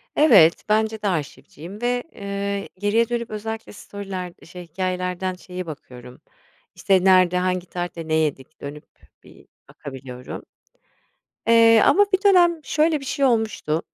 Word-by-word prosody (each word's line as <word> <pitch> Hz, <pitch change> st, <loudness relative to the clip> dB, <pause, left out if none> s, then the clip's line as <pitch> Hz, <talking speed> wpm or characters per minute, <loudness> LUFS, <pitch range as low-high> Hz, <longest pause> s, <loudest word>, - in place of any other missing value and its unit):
Evet, 205 Hz, -, +5 dB
bence 220 Hz, 0 st, +1 dB
de 210 Hz, -, -1 dB
arşivciyim 165 Hz, -, -5 dB
ve, 245 Hz, 0 st, 0 dB
ııı, 200 Hz, 0 st, -4 dB
geriye 220 Hz, +3 st, +1 dB
dönüp 235 Hz, -1 st, -3 dB
özellikle 220 Hz, +1 st, -6 dB
story'ler 195 Hz, -3 st, -7 dB
şey, 180 Hz, +1 st, -10 dB
hikâyelerden 185 Hz, +1 st, -3 dB
şeye 180 Hz, 0 st, -8 dB
bakıyorum, 125 Hz, -5 st, -11 dB, 0.5 s
işte, 190 Hz, -2 st, +2 dB
nerede, 185 Hz, -2 st, +5 dB
hangi 180 Hz, 0 st, -1 dB
tarihte 175 Hz, -2 st, -5 dB
ne 155 Hz, -, -2 dB
yedik 155 Hz, -2 st, -2 dB
dönüp 145 Hz, +1 st, -8 dB, 0.4 s
bir -, -, -18 dB, 0.2 s
bakabiliyorum. 130 Hz, -2 st, -9 dB, 1.1 s
Eee, 230 Hz, -1 st, +6 dB
ama 410 Hz, +2 st, +5 dB
bir 380 Hz, +1 st, +1 dB
dönem 350 Hz, -4 st, +5 dB
şöyle 310 Hz, +1 st, +1 dB
bir -, -, -9 dB
şey 275 Hz, +1 st, -1 dB
olmuştu, 220 Hz, -, 0 dB
190 Hz, 135 wpm, -22 LUFS, 170-225 Hz, 1.1 s, Eee